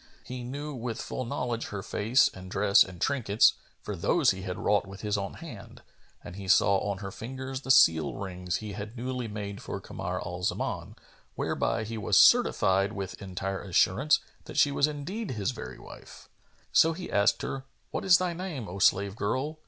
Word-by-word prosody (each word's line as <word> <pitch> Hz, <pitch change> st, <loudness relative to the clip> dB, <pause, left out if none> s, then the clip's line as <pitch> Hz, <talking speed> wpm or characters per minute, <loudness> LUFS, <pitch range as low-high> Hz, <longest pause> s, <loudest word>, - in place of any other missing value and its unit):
He 125 Hz, -1 st, -7 dB
knew 145 Hz, +4 st, -5 dB
with 120 Hz, -2 st, -4 dB
full 130 Hz, -, -4 dB
knowledge 120 Hz, 0 st, -2 dB
her 100 Hz, -2 st, -5 dB
face 115 Hz, +6 st, +3 dB
and 95 Hz, 0 st, -9 dB
dress 100 Hz, +1 st, +5 dB
and 90 Hz, -2 st, -11 dB
trinkets, 115 Hz, -3 st, +3 dB, 0.3 s
for -, -, -4 dB
those -, -, +3 dB
he 95 Hz, -, -5 dB
had 90 Hz, -1 st, -4 dB
wrought 100 Hz, -1 st, +1 dB
with 100 Hz, 0 st, -10 dB
his 105 Hz, -1 st, -1 dB
own 100 Hz, -1 st, -3 dB
hand, -, -, -11 dB, 0.4 s
and 90 Hz, -, -9 dB
he 100 Hz, -1 st, -8 dB
saw 100 Hz, +1 st, +5 dB
on 100 Hz, -1 st, -2 dB
her 95 Hz, -, -5 dB
fingers 130 Hz, +4 st, -6 dB
the 135 Hz, -, -10 dB
seal 80 Hz, -11 st, +5 dB
rings 90 Hz, -2 st, -4 dB
he 110 Hz, -2 st, -4 dB
had 105 Hz, +4 st, -7 dB
newly 125 Hz, 0 st, -3 dB
made 100 Hz, -1 st, -6 dB
for -, -, -5 dB
Kamar 90 Hz, +1 st, -5 dB
al 90 Hz, +1 st, -5 dB
Zaman, 90 Hz, -, -2 dB, 0.4 s
whereby 110 Hz, -, -1 dB
he 110 Hz, +1 st, -5 dB
was 105 Hz, -1 st, +2 dB
certified 105 Hz, -, +4 dB
with 95 Hz, -3 st, -6 dB
entire 95 Hz, 0 st, -4 dB
assurance 100 Hz, -, +3 dB, 0.3 s
that -, -, -8 dB
she 145 Hz, -1 st, +5 dB
was 140 Hz, +1 st, +3 dB
indeed 165 Hz, +10 st, -5 dB
his 110 Hz, -2 st, -1 dB
very 125 Hz, -, -8 dB
wife. -, -, -13 dB, 0.4 s
So 165 Hz, +1 st, +5 dB
he 175 Hz, +2 st, -7 dB
asked 100 Hz, +2 st, +2 dB
her, 135 Hz, -1 st, -4 dB, 0.3 s
"What -, -, -3 dB
is 185 Hz, -2 st, +7 dB
thy 180 Hz, -1 st, -1 dB
name, 165 Hz, -, -5 dB
O 95 Hz, +3 st, -7 dB
slave 100 Hz, +1 st, +3 dB
girl?" 135 Hz, +10 st, -2 dB
105 Hz, 190 wpm, -28 LUFS, 95-130 Hz, 0.4 s, is